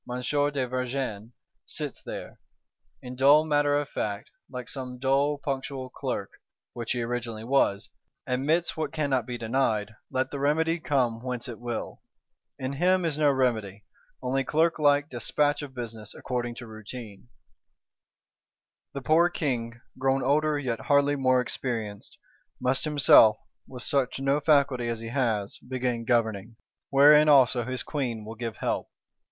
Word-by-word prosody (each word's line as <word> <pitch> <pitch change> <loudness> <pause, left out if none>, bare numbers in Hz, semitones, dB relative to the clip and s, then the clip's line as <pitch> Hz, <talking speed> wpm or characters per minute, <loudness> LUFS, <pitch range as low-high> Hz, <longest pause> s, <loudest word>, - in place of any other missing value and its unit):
de 135 -3 -1
Vergennes 125 -3 -3 0.4
sits - - -5
there, - - -8 0.6
in 125 0 -7
dull 145 +4 +5
matter 145 -1 +2
of 145 - -4
fact, 105 -6 -4 0.2
like 125 -2 -7
some 125 -2 -7
dull 135 +3 +1
punctual 135 -2 -4
Clerk - - -4 0.4
(which 120 0 -3
he 120 -1 -2
originally 115 -2 -4
was); 115 -5 +1 0.3
admits 150 +7 0
what 160 - -3
cannot 140 -6 0
be 120 -1 -4
denied, 110 -3 0 0.2
let 130 0 -1
the 140 - -4
remedy 160 +4 +1
come 125 -7 0
whence 125 0 -4
it 120 -3 -8
will. 120 -1 -5 0.6
In 130 +1 -4
him 180 +4 +2
is 160 -3 0
no 150 -1 +3
remedy; 110 -7 0 0.4
only 135 +2 0
clerklike 150 -2 +2
"despatch 145 +3 0
of 140 -3 -9
business" 115 -3 -7
according 120 -1 -3
to 120 - -8
routine. 110 0 -10 1.7
The 140 - -5
poor 165 +5 +4
King, 120 -8 -3 0.2
grown 135 0 +1
older 150 +3 +2
yet 125 -5 -2
hardly 145 0 +4
more 130 -2 +3
experienced, 115 -5 -4 0.4
must 130 +4 0
himself, 135 -7 +6 0.3
with 125 -3 -7
such 135 -2 0
no 135 +2 +1
faculty 140 -5 +2
as 115 -1 -2
he 115 0 -6
has, 115 -6 -1
begin 125 -2 -3
governing; 110 -2 0 0.3
wherein 150 +2 +7
also 130 -4 +5
his 130 0 -3
Queen 120 -8 -3
will 110 - -7
give 115 -1 -5
help. - - -2
130 Hz, 145 wpm, -27 LUFS, 115-145 Hz, 1.7 s, wherein